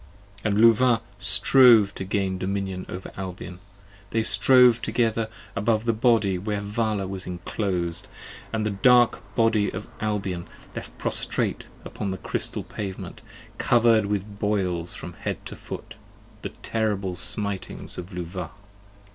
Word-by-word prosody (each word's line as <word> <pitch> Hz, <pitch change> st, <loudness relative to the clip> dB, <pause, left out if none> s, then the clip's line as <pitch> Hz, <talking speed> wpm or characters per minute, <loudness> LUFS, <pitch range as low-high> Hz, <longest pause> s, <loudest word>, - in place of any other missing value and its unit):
And 105 Hz, -1 st, +1 dB
Luvah 115 Hz, +1 st, +5 dB, 0.2 s
strove 105 Hz, +1 st, +6 dB
to -, -, -5 dB
gain 95 Hz, -1 st, -1 dB
dominion 95 Hz, -1 st, -3 dB
over 90 Hz, +1 st, -7 dB
Albion: 90 Hz, -1 st, -7 dB, 0.5 s
They 115 Hz, +1 st, 0 dB
strove 120 Hz, +3 st, +6 dB
together 115 Hz, -2 st, 0 dB, 0.3 s
above 110 Hz, +2 st, +1 dB
the 115 Hz, -, +2 dB
Body 110 Hz, -5 st, +2 dB
where 105 Hz, +2 st, -2 dB
Vala 105 Hz, 0 st, -1 dB
was 95 Hz, 0 st, -4 dB
inclos'd, 90 Hz, -1 st, -3 dB, 0.4 s
And 110 Hz, -1 st, -1 dB
the 105 Hz, -, 0 dB
dark 120 Hz, +4 st, +4 dB, 0.2 s
Body 115 Hz, -3 st, +3 dB
of -, -, -7 dB
Albion 100 Hz, -5 st, -2 dB, 0.3 s
left -, -, -8 dB
prostrate -, -, 0 dB, 0.2 s
upon 100 Hz, -, -4 dB
the 95 Hz, -, -3 dB
crystal -, -, -2 dB
pavement: 95 Hz, -3 st, -7 dB, 0.4 s
Cover'd 115 Hz, -3 st, +4 dB
with 100 Hz, 0 st, -3 dB
boils 95 Hz, -5 st, -1 dB
from -, -, -8 dB
head -, -, -5 dB
to -, -, -7 dB
foot: -, -, -8 dB, 0.5 s
the -, -, -4 dB
terrible 105 Hz, -4 st, -2 dB
smitings 100 Hz, +1 st, -2 dB
of 90 Hz, +3 st, -8 dB
Luvah. 90 Hz, -1 st, -5 dB
100 Hz, 130 wpm, -25 LUFS, 95-110 Hz, 0.5 s, strove